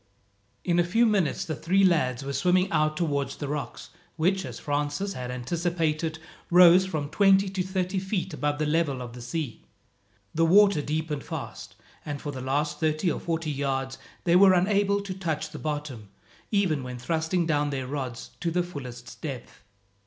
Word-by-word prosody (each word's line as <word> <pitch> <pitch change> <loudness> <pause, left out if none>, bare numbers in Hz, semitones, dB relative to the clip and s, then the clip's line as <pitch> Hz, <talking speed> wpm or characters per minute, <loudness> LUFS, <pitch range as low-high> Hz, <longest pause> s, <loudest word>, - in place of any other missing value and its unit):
In 175 -1 +2
a - - +5
few 225 +8 +3
minutes 200 -9 +1
the 155 - -3
three 190 +7 +2
lads 135 -8 +2
were 140 - -3
swimming 180 +7 +2
out 155 -1 +1
towards 145 -5 -1
the 145 - -5
rocks 145 -4 -5 0.3
which, 185 +3 +1
as - - -7
Francis 150 +7 -2
had 125 -4 -5
anticipated, 160 +4 -1 0.3
rose 180 +1 +7
from 155 -5 -2
twenty 195 +2 +4
to 190 -1 -2
thirty 185 0 -1
feet 190 0 -3
above 145 +2 -1
the 155 - 0
level 150 -3 +1
of 120 -1 -8
the 125 - -9
sea. 125 0 -4 0.7
The 165 - +2
water 195 0 +5
deepened 150 0 -3
fast, - - -7 0.3
and 145 -1 -5
for 145 - -5
the 130 -2 -6
last 145 +3 -1
thirty 155 +2 +1
or - - -3
forty 160 -2 -2
yards, 135 -1 -2 0.2
they 170 0 +3
were 190 0 +7
unable 200 +2 +2
to 200 -2 -5
touch 160 -4 -3
the - - -8
bottom, 145 -9 -4 0.4
even 190 -9 +1
when 125 -1 -6
thrusting 160 +6 0
down 150 -2 +1
their 135 -2 -3
rods 130 -3 -5
to 170 - -1
the 175 +1 +1
fullest 125 -8 -9
depth. 135 -6 -7
155 Hz, 175 wpm, -27 LUFS, 140-180 Hz, 0.7 s, rose